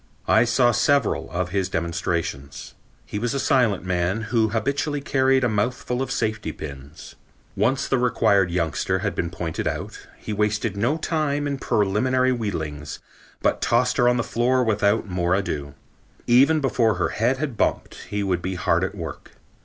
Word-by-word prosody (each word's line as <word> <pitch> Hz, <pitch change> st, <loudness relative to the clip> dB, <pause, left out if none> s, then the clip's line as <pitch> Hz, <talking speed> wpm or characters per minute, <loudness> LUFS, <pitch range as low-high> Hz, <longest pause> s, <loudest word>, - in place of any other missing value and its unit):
I 110 Hz, +2 st, +5 dB
saw 120 Hz, +1 st, +3 dB
several 140 Hz, +4 st, +1 dB
of 90 Hz, 0 st, -2 dB
his 95 Hz, -1 st, -1 dB
demonstrations. 85 Hz, -5 st, -3 dB, 0.3 s
He 105 Hz, -, -4 dB
was 120 Hz, +3 st, -1 dB
a -, -, 0 dB
silent 120 Hz, -9 st, +2 dB
man 90 Hz, +3 st, 0 dB
who 110 Hz, -2 st, +3 dB
habitually 140 Hz, +6 st, -1 dB
carried 135 Hz, -1 st, +2 dB
a -, -, +4 dB
mouthful 120 Hz, +3 st, -1 dB
of 135 Hz, -, -2 dB
safety 110 Hz, -2 st, -1 dB
pins. 70 Hz, +1 st, -10 dB, 0.4 s
Once 135 Hz, +3 st, +1 dB
the 135 Hz, -, +1 dB
required 100 Hz, -6 st, +3 dB
youngster 85 Hz, +2 st, 0 dB
had 100 Hz, -, 0 dB
been 85 Hz, -, -2 dB
pointed 85 Hz, -1 st, -4 dB
out, -, -, -5 dB
he 110 Hz, -, -6 dB
wasted 105 Hz, 0 st, 0 dB
no 120 Hz, +10 st, +1 dB
time 150 Hz, -3 st, -1 dB
in 140 Hz, -1 st, -2 dB
preliminary 125 Hz, +6 st, +1 dB
wheedlings 80 Hz, -, -4 dB, 0.5 s
but -, -, +1 dB
tossed 125 Hz, +1 st, +2 dB
her 120 Hz, 0 st, +4 dB
on 125 Hz, -, +2 dB
the 120 Hz, -, 0 dB
floor 125 Hz, +3 st, +1 dB
without 105 Hz, -1 st, +1 dB
more 90 Hz, -1 st, 0 dB
ado. 75 Hz, -8 st, -3 dB, 0.5 s
Even 140 Hz, +6 st, +5 dB
before 115 Hz, -5 st, +2 dB
her 90 Hz, -, 0 dB
head 120 Hz, +4 st, +1 dB
had 140 Hz, -4 st, -3 dB
bumped, -, -, -1 dB
he 105 Hz, 0 st, -2 dB
would 90 Hz, -3 st, 0 dB
be 95 Hz, +1 st, -3 dB
hard -, -, +1 dB
at -, -, -3 dB
work. -, -, -8 dB
110 Hz, 170 wpm, -23 LUFS, 90-125 Hz, 0.5 s, I